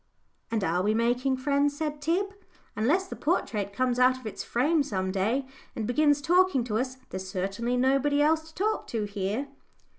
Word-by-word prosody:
"And 225 Hz, -3 st, -1 dB
are 175 Hz, +1 st, +1 dB
we 210 Hz, +3 st, +1 dB
making 245 Hz, +3 st, +1 dB
friends?" 285 Hz, +2 st, +1 dB
said 300 Hz, -1 st, -3 dB
Tib. 370 Hz, +6 st, 0 dB, 0.4 s
"Unless 290 Hz, -, +2 dB
the -, -, -7 dB
portrait 215 Hz, -, -1 dB
comes 250 Hz, +3 st, 0 dB
out 255 Hz, +1 st, +5 dB
of 255 Hz, -, -14 dB
its 215 Hz, -, -5 dB
frame 295 Hz, +7 st, +2 dB
some 190 Hz, -9 st, -2 dB
day, 220 Hz, +8 st, 0 dB, 0.3 s
and 220 Hz, -, -2 dB
begins 290 Hz, +4 st, +2 dB
talking 355 Hz, -5 st, +3 dB
to 220 Hz, -2 st, -1 dB
us, 255 Hz, +1 st, -3 dB
there's 190 Hz, 0 st, -5 dB
certainly 195 Hz, +7 st, -2 dB
nobody 275 Hz, +3 st, +2 dB
else 315 Hz, +2 st, +2 dB
to -, -, -29 dB
talk 430 Hz, +3 st, -1 dB
to 225 Hz, -2 st, -2 dB
here." 205 Hz, +6 st, -3 dB
255 Hz, 180 wpm, -27 LUFS, 215-290 Hz, 0.4 s, out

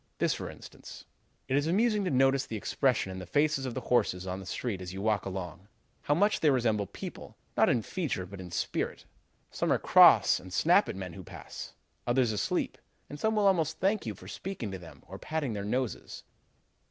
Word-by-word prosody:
This, -, -, +2 dB
for -, -, -5 dB
instance: -, -, -12 dB, 0.4 s
"'It 130 Hz, -, 0 dB
is 145 Hz, +2 st, +2 dB
amusing 210 Hz, +4 st, +2 dB
to -, -, +1 dB
notice 135 Hz, -1 st, +3 dB
the 110 Hz, -, -4 dB
expression 125 Hz, -2 st, 0 dB
in 95 Hz, -, -6 dB
the 90 Hz, -, -8 dB
faces 145 Hz, +4 st, +1 dB
of 120 Hz, -, -5 dB
the 130 Hz, -, -3 dB
horses 95 Hz, -7 st, +1 dB
on 95 Hz, 0 st, -4 dB
the 95 Hz, -, -10 dB
street 105 Hz, -5 st, -3 dB
as 90 Hz, -1 st, -6 dB
you 95 Hz, -, -6 dB
walk 105 Hz, -1 st, 0 dB
along; 95 Hz, 0 st, -6 dB, 0.3 s
how 145 Hz, -, +1 dB
much 205 Hz, +5 st, +3 dB
they 155 Hz, -, +4 dB
resemble 115 Hz, -6 st, +1 dB
people, -, -, -9 dB, 0.2 s
not -, -, +4 dB
in 120 Hz, -3 st, +2 dB
feature, 140 Hz, -, -3 dB
but 95 Hz, +1 st, -9 dB
in 90 Hz, -, -8 dB
spirit. 85 Hz, -, -3 dB, 0.5 s
Some -, -, -1 dB
are -, -, +4 dB
cross -, -, +6 dB
and 95 Hz, -, -12 dB
snap 90 Hz, -, +4 dB
at -, -, -4 dB
the -, -, -7 dB
men 90 Hz, -2 st, -6 dB
who 95 Hz, -, -9 dB
pass; -, -, -9 dB, 0.3 s
others 120 Hz, -1 st, +3 dB
asleep; 105 Hz, -1 st, -1 dB, 0.3 s
and 145 Hz, -, -7 dB
some 220 Hz, 0 st, +1 dB
will 210 Hz, -1 st, +2 dB
almost 165 Hz, -5 st, +2 dB
thank 195 Hz, -, 0 dB
you 105 Hz, -, -3 dB
for 90 Hz, -, -13 dB
speaking 145 Hz, -, -5 dB
to 95 Hz, -, -6 dB
them 80 Hz, -5 st, -13 dB
or 95 Hz, +1 st, -9 dB
patting 155 Hz, -6 st, -2 dB
their 100 Hz, -1 st, -4 dB
noses.' 125 Hz, +3 st, -3 dB
115 Hz, 215 wpm, -30 LUFS, 95-150 Hz, 0.5 s, cross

